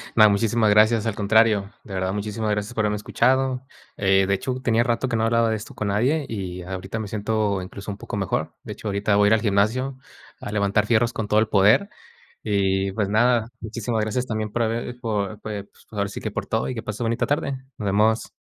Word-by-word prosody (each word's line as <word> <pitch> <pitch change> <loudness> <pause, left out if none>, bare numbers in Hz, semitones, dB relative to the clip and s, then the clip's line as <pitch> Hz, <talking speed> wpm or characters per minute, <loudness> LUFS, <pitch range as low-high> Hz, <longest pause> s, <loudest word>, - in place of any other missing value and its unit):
No, 110 -1 +7
muchísimas 110 +2 +2
gracias, 110 +2 +4
al 110 -3 -1
contrario. 105 -1 +3
De 100 - -10
verdad, 95 0 -1
muchísimas 105 +1 -3
gracias, 105 +3 -2
por 110 -2 0
haberme 105 0 0
escuchado. 130 +4 +1 0.3
Eh, 95 -1 +3
de 100 - +2
hecho, 125 +7 -2
tenía 115 -2 +2
rato 120 +1 0
que 120 - -1
no 110 - +1
hablaba 115 0 +3
de 110 - +1
esto 105 - -8
con 105 - -2
nadie, 130 +9 +1
y 90 -4 -5
ahorita 95 +4 -5
me 110 - -4
siento, 105 -2 -1
incluso 100 +3 -7
un 100 - -7
poco 105 - -6
mejor. 95 -2 -2
De - - -6
hecho, 110 - -8
ahorita 100 +1 +1
voy 100 0 +5
a - - +5
ir - - +5
al 110 - +3
gimnasio, 115 +6 +1 0.4
a - - -5
levantar 105 0 +1
fierros 115 0 +2
con 110 - -3
todo 105 +1 +3
el 110 - +2
poder. 105 - +4 0.5
Y 95 -2 +1
pues 105 0 -1
nada, 115 +2 +3
muchísimas 115 0 -3
gracias, 115 +4 -1
también 110 -3 -3
por 120 - 0
haber 120 +2 -2
por 105 -3 -2
pues, 105 -2 -5 0.2
ahora 100 -2 -2
sí 100 - -7
que, 110 - -3
por 105 0 -4
todo, 110 - -1
y 130 - -3
que 115 - -5
pases 105 +1 -6
bonita 115 +1 0
tarde. 145 -1 0 0.3
Nos 105 - -4
vemos. 105 +3 +2
110 Hz, 225 wpm, -23 LUFS, 100-115 Hz, 0.5 s, No